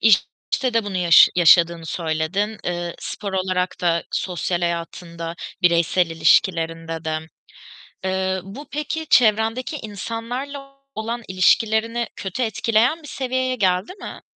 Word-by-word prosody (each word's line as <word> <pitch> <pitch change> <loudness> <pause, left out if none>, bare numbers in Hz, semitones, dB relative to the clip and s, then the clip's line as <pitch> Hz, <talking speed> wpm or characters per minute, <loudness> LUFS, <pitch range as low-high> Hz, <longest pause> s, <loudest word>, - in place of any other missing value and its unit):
İşte 230 +4 +1
de 230 - +2
bunu 200 -2 -4
yaş 175 -2 +7
yaşadığını 170 -1 +5
söyledin, 170 +7 -2
ııı, 175 -1 -3
spor 200 -2 -5
olarak 185 -1 -1
da 170 -1 +1
sosyal 180 -1 -2
hayatında, 170 0 -4 0.3
bireysel 170 +1 +3
ilişkilerinde 165 0 +1
de. 155 0 -1 0.9
Iıı, 190 0 -1
bu 210 +10 -10
peki 305 +2 -3
çevrendeki 225 +4 +3
insanlarla 245 +6 -6 0.2
olan 230 +2 -4
ilişkilerini 220 +5 +2
kötü 195 +6 -3
etkileyen 230 +7 +1
bir - - -10
seviyeye 260 -1 -1
geldi 190 - 0
mi? - - -8
190 Hz, 115 wpm, -22 LUFS, 170-230 Hz, 0.9 s, yaş